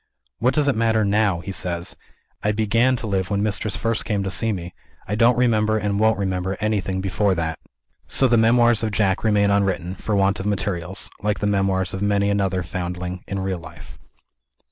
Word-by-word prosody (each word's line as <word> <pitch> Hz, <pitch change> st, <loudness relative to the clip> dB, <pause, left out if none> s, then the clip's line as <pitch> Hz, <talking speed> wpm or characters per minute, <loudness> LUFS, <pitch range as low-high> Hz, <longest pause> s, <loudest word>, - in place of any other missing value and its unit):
"What 125 Hz, +4 st, +2 dB
does 150 Hz, -1 st, +2 dB
it 140 Hz, -, +2 dB
matter 110 Hz, -1 st, +2 dB
now?" 100 Hz, -3 st, +1 dB
he 95 Hz, -, -6 dB
says. 85 Hz, -2 st, -2 dB, 0.5 s
"I 105 Hz, -, +1 dB
began 115 Hz, +4 st, +2 dB
to 120 Hz, -, -5 dB
live 95 Hz, -3 st, -1 dB
when 100 Hz, 0 st, 0 dB
Mistress 105 Hz, -1 st, -1 dB
first 115 Hz, -1 st, -1 dB
came 100 Hz, -3 st, -1 dB
to 95 Hz, -, -3 dB
see 115 Hz, +3 st, +3 dB
me. 90 Hz, -3 st, -5 dB, 0.3 s
I 105 Hz, -, -3 dB
don't 115 Hz, +3 st, +4 dB
remember, 110 Hz, -3 st, +2 dB
and 105 Hz, -1 st, -1 dB
won't 110 Hz, 0 st, +3 dB
remember, 95 Hz, -1 st, -2 dB
anything 100 Hz, -3 st, -1 dB
before 95 Hz, +1 st, +1 dB
that." 80 Hz, -2 st, -3 dB, 0.5 s
So 135 Hz, -, +3 dB
the 120 Hz, -, +3 dB
memoirs 120 Hz, 0 st, +4 dB
of 110 Hz, -, 0 dB
Jack 100 Hz, -2 st, 0 dB
remain 105 Hz, -2 st, +3 dB
unwritten, 95 Hz, -3 st, 0 dB
for 105 Hz, +2 st, -3 dB
want 100 Hz, +1 st, +2 dB
of 95 Hz, -, -3 dB
materials 95 Hz, -3 st, -2 dB
like 105 Hz, +1 st, 0 dB
the -, -, -3 dB
memoirs 95 Hz, -2 st, 0 dB
of 95 Hz, -, -4 dB
many 100 Hz, 0 st, +1 dB
another 95 Hz, -2 st, 0 dB
foundling, 90 Hz, -1 st, -5 dB
in 100 Hz, -, -3 dB
real 95 Hz, -2 st, -2 dB
life. 85 Hz, -, -13 dB
100 Hz, 195 wpm, -22 LUFS, 95-110 Hz, 0.5 s, don't